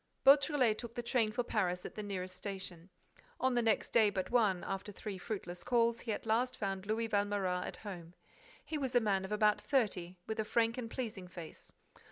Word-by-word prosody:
Beautrelet 275 -5 +5
took 235 -1 -7
the 240 - -3
train 235 -2 +2
for 245 +2 -1
Paris 180 -6 0
at - - -6
the 215 - -5
nearest 185 -3 -4
station. 185 -3 -5 0.5
On 260 0 +2
the 240 - +3
next 225 -2 +2
day 220 -3 +5
but 190 0 -3
one, 210 -7 +3
after 195 +2 -4
three 200 -1 -6
fruitless 180 -4 -5
calls, 235 -1 +2
he 230 - -3
at 210 - -3
last 245 +3 +1
found 195 -1 -3
Louis 225 +1 0
Valméras 200 -3 0
at - - -7
home. 175 -4 -7 0.5
He 310 - -3
was 265 -2 -2
a - - +8
man 195 -4 +1
of 190 - -8
about 210 0 +3
thirty, 185 -9 0
with 220 0 -4
a - - +2
frank 230 +1 +2
and 230 -2 -4
pleasing 215 -7 -5
face. 170 -3 -10
210 Hz, 205 wpm, -34 LUFS, 190-235 Hz, 0.5 s, a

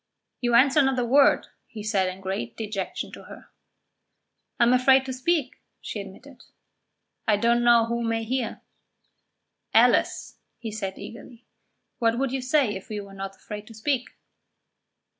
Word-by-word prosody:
"You 240 -1 +1
answer 270 +4 +5
not 265 -1 +1
a 245 - +1
word," 275 +4 +4 0.2
he 215 -3 -9
said 200 -3 +1
in 185 +1 -9
great 190 -12 -4
dejection 205 -3 -4
to - - -11
her. - - -13 1.1
"I - - +5
am 240 +1 +5
afraid 265 +1 +5
to 260 - -4
speak," 265 +1 -1 0.2
she 210 - -5
admitted. 240 +8 -13 0.9
"I 210 -2 +4
don't 235 +2 +2
know 235 -1 +5
who 235 +1 -2
may 225 -1 -1
hear." 245 +1 -3 1.1
"Alice," - - +3 0.2
he 225 -2 -6
said 195 -3 -5
eagerly, 235 +1 -11 0.5
"what 230 0 +2
would 270 0 0
you 265 0 -2
say 255 -3 +2
if 190 - -9
you 210 -1 -4
were 200 0 -13
not 195 0 -6
afraid 210 +2 -9
to 225 - -12
speak?" 250 +3 -1
235 Hz, 160 wpm, -25 LUFS, 210-255 Hz, 1.1 s, answer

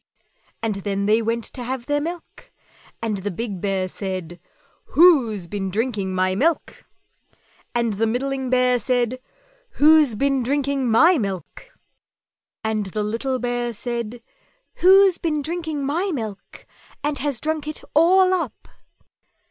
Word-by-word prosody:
_" - - -45 0.4
And 220 -2 0
then 200 0 -2
they 215 +2 +3
went 230 +1 -1
to 250 - -5
have 250 0 -4
their 290 +1 0
milk, 340 +2 -7 0.5
and 215 -3 -1
the 195 +2 -4
big 200 -1 -5
Bear 195 -2 -1
said, 185 -3 -6 0.6
"WHO'S 260 - +5
BEEN 195 +1 -4
DRINKING 205 -2 -2
MY 185 0 +1
MILK?" 310 - -1 0.9
and 235 -2 +1
the 225 +3 0
middling 265 +3 -2
Bear 250 -1 +3
said, 245 +2 0 0.5
"WHO'S 300 -5 +5
BEEN 275 +3 +1
DRINKING 275 0 0
MY 320 +9 +5
MILK?" 195 - -5 0.9
and 215 -2 -1
the 210 +3 -3
little 235 +5 -2
Bear 245 -1 -2
said, 235 0 -5 0.6
"_Who's 380 0 +6
been 305 -3 -1
drinking 315 -3 -3
my 345 +8 -1
milk 220 - -7 0.4
and 290 -1 -1
has 280 -3 -1
drunk 310 -1 -2
it 305 - -6
all 370 +4 +5
up? 360 -2 -3
245 Hz, 140 wpm, -22 LUFS, 210-290 Hz, 0.9 s, Who's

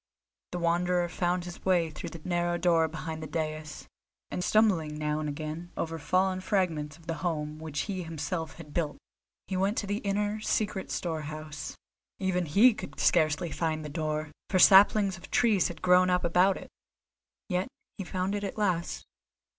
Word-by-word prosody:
The 180 - -3
Wanderer 175 +1 +1
found 175 0 -1
his 175 -1 -9
way 175 -4 +2
through 155 - -6
the 165 0 -10
narrow 175 -1 +1
door 170 -2 +3
behind 160 0 -6
the 155 - -5
dais, 155 -1 -4 0.4
and 180 - -2
stumbling 180 -9 +2
now 150 0 -1
and 150 -1 -2
again 155 +4 -5
over 165 0 -3
fallen 185 +4 +1
fragments 160 -7 -1
of 165 - -19
the 165 - -2
home 155 -3 -2
which 155 -2 -3
he 190 -3 -3
himself 160 0 -4
had 150 -3 -11
built, 155 -4 -1 0.5
he 190 - -4
went 195 +4 +1
to - - 0
the 205 +1 -1
inner, 205 +1 -1
secret 210 -3 -1
storehouse. 155 -3 -4 0.4
Even 180 -3 0
he 215 +11 +6
could - - -8
scarcely 160 0 +2
find 155 -2 -2
the - - -5
door, 155 0 -2 0.2
for 190 - +2
saplings 195 +1 +7
of 175 - -12
trees 225 -6 +3
had 175 - -9
grown 180 0 +5
up 180 0 +2
about 180 +3 +3
it; - - -11 0.8
yet 180 -1 0 0.3
he - - -2
found 185 +2 -2
it 205 0 -2
at 200 - -4
last. 180 -5 -1
175 Hz, 175 wpm, -29 LUFS, 155-185 Hz, 0.8 s, saplings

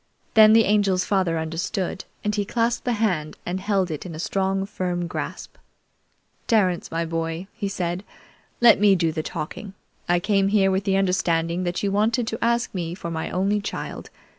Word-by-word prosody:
Then 220 -1 +8
the 225 -1 +6
Angel's 200 -3 +2
father 185 -5 +1
understood, 165 +4 -3 0.2
and 210 - 0
he 205 -1 0
clasped 230 +3 -1
that 245 - +1
hand 180 -9 -1
and 180 +2 -2
held 195 -3 0
it 155 - -4
in 175 -3 -7
a - - -7
strong, 195 +2 0
firm 180 -3 -3
grasp. 170 - -6 0.9
"Terence, 190 -6 +2
my 165 +1 -2
boy," 165 +1 -3
he 210 -3 -3
said, 180 -1 -3 0.6
"let 235 -4 +7
me 205 -1 +5
do 165 -3 +1
the 155 0 -2
talking. 190 +6 -6 0.3
I 175 0 +4
came 195 +1 +2
here 195 -1 +3
with 190 +1 0
the 195 -1 +2
understanding 175 -2 +1
that 175 +2 -2
you 200 - +1
wanted 225 +4 +1
to 225 - -4
ask 235 +1 +1
me 175 -2 -3
for 170 -3 -6
my 160 -1 -3
only 200 +3 0
child. 205 - -6
190 Hz, 185 wpm, -24 LUFS, 175-210 Hz, 0.9 s, Then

